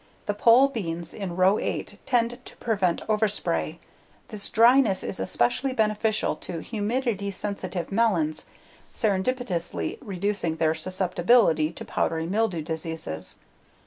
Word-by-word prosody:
The 205 - 0
pole 235 +6 +6
beans 170 -10 -4
in 190 -4 -5
row 185 +3 +4
8 - - -3
tend 245 0 +1
to - - -10
prevent 195 -7 0
overspray; 210 - 0 0.5
this 205 -2 -7
dryness 230 -3 +5
is - - -5
especially 120 - +1
beneficial 215 -1 +1
to 175 - -6
humidity 215 +1 -2
sensitive 190 -2 -4
melons, 180 -8 +1 0.5
serendipitously 205 -3 -1
reducing 200 -3 -1
their 160 -1 +2
susceptability 180 0 +2
to - - -7
powdery 160 0 -1
mildew 190 -3 0
diseases. 160 - -4
200 Hz, 115 wpm, -26 LUFS, 170-225 Hz, 0.5 s, pole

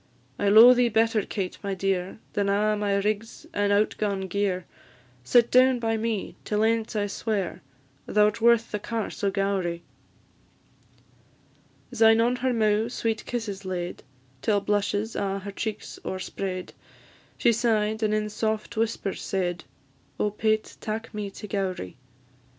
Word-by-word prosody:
I 205 - +2
lo'e 225 +4 +9
thee 245 -1 +3
better, 225 0 +2
Kate, 190 -2 -4
my 200 -1 -3
dear, 190 -1 -1 0.2
Than 200 -1 0
a' 210 +2 +2
my 205 -1 0
rigs 210 +3 -2
and 205 0 +1
out 205 +1 +3
gaun 200 -2 0
gear; 190 -1 -1 0.6
Sit 235 - +4
down 255 0 +5
by 225 -1 0
me 220 -2 -2
till 210 0 0
ance 225 0 +1
I 205 -1 +1
swear, 205 -2 -3 0.5
Thou 210 0 +4
'rt 210 +2 -1
worth 235 0 +4
the 210 - -2
Carse 225 0 -4
o' 200 - +3
Gowrie." 195 -4 -1 2.1
Syne 225 -2 +5
on 240 +2 +2
her 255 +1 0
mou' 220 -1 +2
sweet 225 -2 -2
kisses 210 -5 -4
laid, 180 -2 -4 0.4
Till 205 +3 +2
blushes 205 +2 -1
a' 195 -1 -1
her 200 +1 -6
cheeks 215 +1 -5
o'erspread; 185 0 -4 0.6
She 235 - +4
sigh'd, 220 -1 +1
and 215 -1 +1
in 215 0 -1
soft 220 +1 -2
whispers 220 -3 -2
said, 175 -3 -2 0.5
"Oh, 210 - +1
Pate, 215 +1 -1
tak 225 +1 -4
me 210 -1 -4
to 210 +2 -9
Gowrie!" 190 - -3
210 Hz, 150 wpm, -26 LUFS, 195-225 Hz, 2.1 s, lo'e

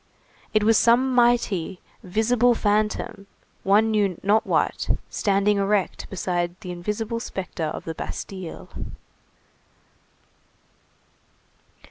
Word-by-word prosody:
It 215 -1 +2
was 220 0 +5
some 250 +3 +4
mighty, 235 -8 +2 0.2
visible 230 +5 +2
phantom, 210 0 0 0.3
one 210 +3 +3
knew 200 -5 +1
not 210 +3 +3
what, - - 0 0.2
standing 200 0 +2
erect 200 -1 0
beside 175 -1 -2
the 180 -4 -6
invisible 210 +6 -3
spectre 185 -7 -4
of - - -5
the 165 - -3
Bastille. 185 +1 -7
205 Hz, 95 wpm, -24 LUFS, 185-225 Hz, 0.3 s, was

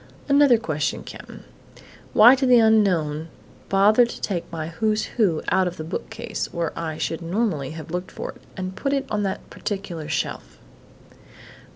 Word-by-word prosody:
"Another 280 -3 +5
question, 155 -9 -2
Cap'n - - -11 0.7
why 235 +4 +9
did 265 -1 +1
the 250 - +7
unknown 180 -9 +3 0.4
bother 205 +5 +5
to 240 - -4
take 175 -5 -3
my 160 -1 -4
'Who's 215 +6 0
Who' 190 -9 0
out 190 -1 +3
of 180 - -5
the 155 - -5
bookcase, 165 +4 -5
where 170 -2 -2
I 160 -2 -4
should 165 +1 -3
normally 170 - -1
have 160 0 -9
looked 180 +1 -3
for - - -6
it, - - -20 0.2
and 185 0 -4
put 275 +5 -1
it 275 -1 0
on 210 - 0
that 195 -2 -3
particular 185 -7 -5
shelf?" - - -3
190 Hz, 165 wpm, -23 LUFS, 160-220 Hz, 0.7 s, why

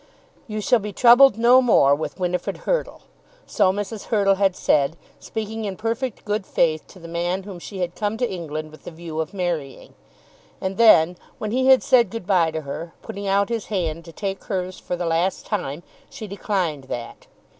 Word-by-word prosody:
"You 215 -1 -4
shall 245 +3 +3
be 210 0 -5
troubled 245 0 +7
no 245 +3 +6
more 215 - +5
with 150 +2 -3
Winifrid 180 -1 -2
Hurtle." - - -1 0.4
So 195 -3 +2
Mrs. 205 +2 -5
Hurtle 200 -3 +3
had 195 -1 +1
said, 145 +2 +1 0.2
speaking 220 0 -5
in 195 -3 -4
perfect 230 +2 -3
good 210 -1 -1
faith 155 -2 +1
to - - -16
the 170 -2 -11
man 175 +3 -2
whom 190 -3 -9
she 190 +2 -7
had 175 -1 -2
come 210 +2 -2
to 245 +1 0
England 155 -5 -5
with 155 - -16
the - - -5
view 165 -1 -7
of 160 -1 -2
marrying. 170 -8 -4 0.7
And 190 0 -3
then 180 -7 +6 0.2
when 215 -5 -4
he 260 +2 +1
had 265 -1 +6
said 245 -6 +4
good 225 -3 -6
bye 180 -4 +3
to 160 0 -4
her, 160 +4 -7
putting 200 0 -6
out 200 +2 +2
his 230 -3 -3
hand 170 -5 -2
to 165 - -10
take 195 +2 -4
hers 185 -2 -3
for 180 - -4
the 175 0 -3
last 170 +3 0
time, 175 -7 -3 0.3
she 220 - -8
declined 185 -8 -2
that. 120 -2 -7
190 Hz, 195 wpm, -22 LUFS, 170-215 Hz, 0.7 s, troubled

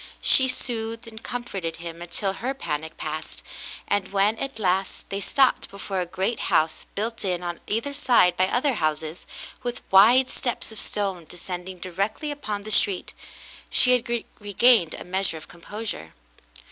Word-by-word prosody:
She 260 - +6
soothed 230 -2 -3
and 220 -1 -10
comforted 195 -9 -4
him 170 0 -8
until 190 +3 -2
her 255 +7 -3
panic 160 - -4
passed, 155 +1 -5 0.4
and 205 -2 0
when, 200 +2 +3
at 275 -3 -4
last, 190 -2 -1
they 200 +1 -2
stopped 265 +5 +2
before 200 -1 -4
a 175 - -3
great 190 +6 -2
house 160 +1 +1
built 225 +3 -3
in 180 -2 -1
on 175 -1 -4
either 230 +7 -1
side 245 -10 +4
by 185 - +2
other 260 +6 +1
houses, 155 -3 -2 0.3
with 245 0 -4
wide 235 +7 +7
steps 245 -3 -3
of 220 - -6
stone 195 -5 -2
descending 180 +1 -6
directly 195 - -3
upon 215 -8 -4
the 215 - -5
street, 200 -2 +5 0.6
she 250 - +3
had 240 -1 +1
regained 205 -3 +4
a - - -8
measure 185 -2 -1
of 155 - -11
composure. 190 - -7
200 Hz, 160 wpm, -25 LUFS, 180-235 Hz, 0.6 s, wide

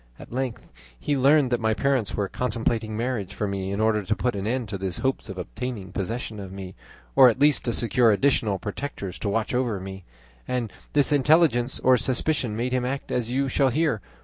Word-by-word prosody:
At - - -12
length 130 -2 -3 0.4
he 145 - 0
learned 140 0 +4
that 120 - +2
my 110 -1 +1
parents 130 -2 0
were 100 -1 0
contemplating 115 -1 -2
marriage 115 -5 -2
for 105 - -1
me 95 -1 -3
in 100 - -2
order 110 -1 +2
to 105 +2 -1
put 125 -1 -1
an 100 +1 -3
end 125 0 -1
to 100 -1 -4
his 95 -2 -3
hopes 130 -3 -2
of 95 - -6
obtaining 105 0 -5
possession 110 +2 -4
of 95 -2 -7
me, 95 -1 -8 0.4
or 130 - +9
at 115 - -1
least 145 0 +4
to 120 - +1
secure 120 0 +3
additional 110 -3 +2
protectors 105 -2 -5
to 105 - -2
watch 110 +3 -1
over 120 -5 0
me, 95 0 -8 0.4
and 125 -4 -2 0.2
this 145 -1 +3
intelligence 140 -3 +3
or 130 0 +5
suspicion 130 -2 0
made 125 +2 -1
him 130 -1 +1
act 135 +2 -3
as 120 -2 -1
you 135 +2 0
shall 135 +1 +2
hear. 145 -5 0
120 Hz, 205 wpm, -25 LUFS, 105-130 Hz, 0.4 s, or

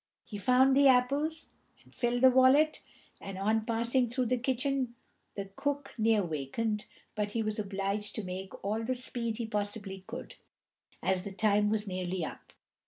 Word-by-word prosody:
He 205 - -7
found 255 +5 +4
the 280 0 +6
apples, 280 +5 +2 0.3
and - - -22
filled 240 0 0
the 260 - +9
wallet; 260 +5 +5 0.4
and 195 -1 -7
on 215 +3 +1
passing 235 +2 +1
through 250 +1 0
the 250 +2 +1
kitchen 260 0 -1 0.4
the 195 -1 -5
cook 285 0 -2
near 220 -3 +3
wakened, 175 +8 -2 0.3
but 210 -1 -2
he 230 - 0
was 215 0 -2
obliged 200 +1 -2
to 220 - -3
make 185 +1 -7
all 215 +3 -1
the 255 +3 -1
speed 235 -3 -3
he 235 - -2
possibly 205 -2 -4
could, 240 +3 -8 0.7
as 190 -1 +1
the 200 - -7
time 210 +1 +2
was 215 0 0
nearly 185 -2 -2
up. - - -9
225 Hz, 170 wpm, -31 LUFS, 200-255 Hz, 0.7 s, the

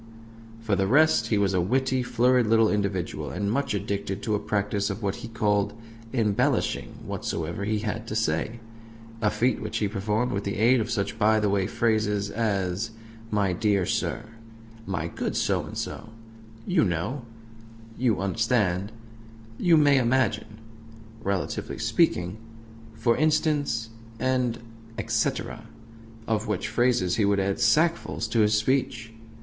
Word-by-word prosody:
For 115 -3 0
the 95 0 +1
rest, 145 -2 +4
he 110 - +1
was 100 -1 +2
a 90 - +2
witty, 130 +6 +1
florid 125 0 +2
little 110 0 +4
individual, 100 -3 -2
and 100 +2 -2
much 140 -2 0
addicted 100 0 -3
to 110 - -1
a 105 - +1
practice 105 -1 -1
of 105 +2 -5
what 100 -1 -1
he - - -7
called 105 -3 0 0.4
"embellishing" 110 -6 0
whatsoever 85 +4 -3
he 110 +1 0
had 110 +2 -4
to 110 - -4
say 110 +3 -1 0.6
a 105 - +3
feat 115 +5 0
which 110 +1 -3
he 105 - +1
performed 105 +4 -1
with 100 0 -2
the 100 - -2
aid 120 +4 +4
of 110 - -3
such 105 -5 -2
by 110 +1 +4
the 105 -2 +1
way 100 -2 +1
phrases 105 -3 0
as 100 -2 -1 0.4
"my 100 -4 +1
dear 100 -1 +1
sir," 115 - -1 0.6
"my 85 -4 -2
good - - -3
So - - +1
and - - -8
So," 110 - -5 0.6
"you 180 -3 +3
know," 100 - -1 0.7
"you 115 -6 +1
understand," 100 -2 0 0.7
"you 170 -3 +5
may 145 -2 +5
imagine," 115 -4 0 0.6
"relatively 100 -4 -2
speaking," 90 +4 +1 0.6
"for 115 -2 +2
instance," 150 -6 +1 0.3
and 125 -2 +1 0.4
"et 115 - -5
cetera"; 115 -1 -1 0.6
of 110 0 0
which 105 -4 -2
phrases 120 -7 +2
he 110 - +2
would 100 0 +2
add 100 +2 0
sackfuls 150 0 +2
to 115 - +2
his 105 0 +4
speech. 115 0 0
110 Hz, 150 wpm, -26 LUFS, 100-120 Hz, 0.7 s, you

